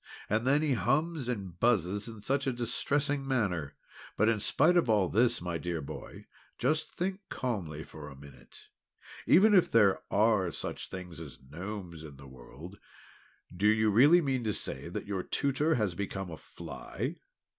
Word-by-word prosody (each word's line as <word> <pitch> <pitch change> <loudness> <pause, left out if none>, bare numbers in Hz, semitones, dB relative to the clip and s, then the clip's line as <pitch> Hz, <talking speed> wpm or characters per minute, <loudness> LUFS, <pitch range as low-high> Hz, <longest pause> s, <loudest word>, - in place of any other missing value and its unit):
And, 115 +4 +1
then, 145 +3 +4
he 150 -3 +2
hums 135 - 0
and 95 -7 -4
buzzes 105 -3 +1
in 110 -2 -9
such 140 +5 0
a - - +2
distressing 135 +4 -1
manner. 90 - -1 0.4
But 110 +2 +4
in 115 -2 +1
spite 175 - +3
of 170 -9 +3
all 105 -4 +4
this, 120 +3 +2
my 85 -2 -3
dear 85 -1 -3
boy, 70 - -9 0.3
just 155 +6 0
think 190 +2 -2
calmly 90 - -3
for 75 -1 -10
a 70 - -11
minute. 70 +1 -15 0.7
Even 210 +5 +6
if 185 -4 +5
there 105 -4 +4
are 105 -3 +3
such - - -5
things 90 -3 -8
as 75 -5 -9
Gnomes 85 +4 -7
in 75 -3 -10
the 70 - -13
world, 70 +9 -12 0.8
do 100 +4 +2
you 110 0 +4
really 145 - +6
mean 135 -5 -1
to 105 - 0
say - - -5
that - - -5
your 100 -2 -2
Tutor 145 - 0
has 105 -6 0
become 95 -1 -4
a 80 - -7
fly?" - - -6
105 Hz, 170 wpm, -30 LUFS, 90-135 Hz, 0.8 s, Even